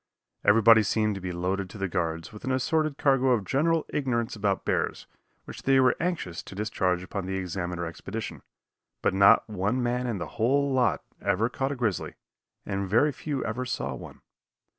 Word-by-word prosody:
Everybody 115 +2 +7
seemed 110 0 +1
to 100 - -6
be 90 0 -4
loaded 90 +2 -2
to 105 - -10
the 95 -1 -1
guards 85 -2 -3
with 105 - -11
an 130 - -1
assorted 155 +3 0
cargo 135 -2 +3
of 110 -5 0
general 160 - +1
ignorance 125 -4 -1
about 100 -2 -1
bears, - - -1 0.4
which - - -9
they 135 0 +4
were 130 -1 +4
anxious 165 - -2
to - - -11
discharge 95 -4 0
upon 95 0 -5
the 95 - -2
Examiner 90 -1 -3
expedition, 95 +7 -6 0.6
but - - +2
not 100 +1 +6
one 105 +4 -1
man 125 +1 0
in 115 -4 -2
the 90 - -4 0.2
whole 140 +4 +2
lot 125 -2 +2 0.2
ever 100 +4 +1
caught 135 +2 -2
a - - -2
grizzly, 115 -8 -2 0.5
and 100 -1 -3
very 120 +9 +4
few 145 -1 -4
ever 115 +3 -2
saw 120 - -3
one. 65 - -10
110 Hz, 185 wpm, -27 LUFS, 95-130 Hz, 0.6 s, Everybody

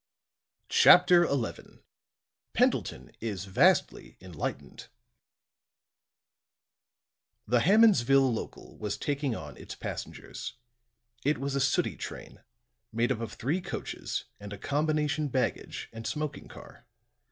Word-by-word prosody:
CHAPTER 175 -1 +7
XI 135 -5 -4 0.7
PENDLETON - - 0
IS 100 -4 -4
VASTLY 95 - +2
ENLIGHTENED 90 -5 -6 2.6
The 120 +3 +3
Hammondsville 135 - +5
local 110 - -7
was 105 -1 -3
taking 140 -4 -1
on 75 -7 -8
its - - -9
passengers. - - -7 0.7
It 150 +2 +2
was 140 +1 -3
a 140 - 0
sooty 135 - +1
train, - - -8 0.5
made 115 +3 +1
up 120 - -1
of 115 -3 -5
three 150 +10 -1
coaches - - -5
and 100 0 -9
a 105 - -6
combination 150 +3 0
baggage 130 -3 -2
and 115 0 -6
smoking 150 -1 -4
car. - - -14
135 Hz, 105 wpm, -29 LUFS, 110-150 Hz, 2.6 s, CHAPTER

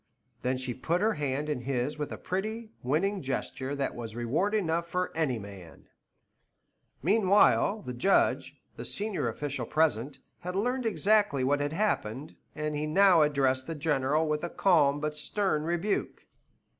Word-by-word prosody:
Then 130 +1 0
she 130 -1 -3
put 165 +8 -1
her 215 +3 +2
hand 145 -1 -2
in 150 -5 -2
his 135 +3 -2
with 150 - -3
a - - -5
pretty, 215 +4 -4
winning 185 +10 0
gesture 135 0 -3
that 140 -1 -2
was 115 -2 -7
reward 150 - 0
enough 170 -4 0
for 180 +1 -2
any 150 -7 0
man. 100 -5 -11 1.1
Meanwhile, 200 +2 +4
the 125 - -5
Judge, 190 +11 +2 0.2
the - - -5
senior 205 - -2
official 130 +1 -3
present, 145 -4 +1 0.2
had 180 +1 -5
learned 245 +4 0
exactly 205 -10 +2
what 145 +2 +2
had 145 +1 -2
happened, 150 - -2 0.2
and 150 0 -2
he 150 +1 -2
now 185 +1 +5
addressed 135 -3 +2
the 165 - -4
General 150 0 +1
with 150 +1 -1
a 175 - -2
calm 145 -8 +3
but 150 0 -3
stern 155 0 -1
rebuke. 175 +5 -2
150 Hz, 155 wpm, -29 LUFS, 135-190 Hz, 1.1 s, now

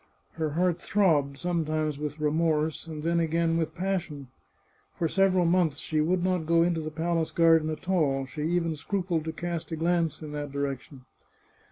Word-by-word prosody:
Her 160 -2 -2
heart 180 -1 +1
throbbed, 150 -9 +2
sometimes 155 -3 -1
with 150 0 -4
remorse, 155 +1 0
and 155 -2 -6
then 170 +1 +1
again 165 0 +1
with 160 -1 -1
passion. 175 -7 -3 0.7
For 165 - +1
several 185 0 +3
months 170 -4 +2
she 155 0 -1
would 175 +3 +1
not 180 -4 0
go 165 0 +4
into 170 -1 0
the 155 - -4
palace 165 +1 -1
garden 165 -2 +4
at 155 +2 -6
all; 145 -8 +1
she 140 +3 -7
even 165 0 0
scrupled 175 0 -2
to 160 - -2
cast 170 0 -5
a - - -1
glance 165 -1 0
in 150 - -7
that 145 -1 -5
direction. 140 -1 -4
160 Hz, 175 wpm, -27 LUFS, 150-175 Hz, 0.7 s, go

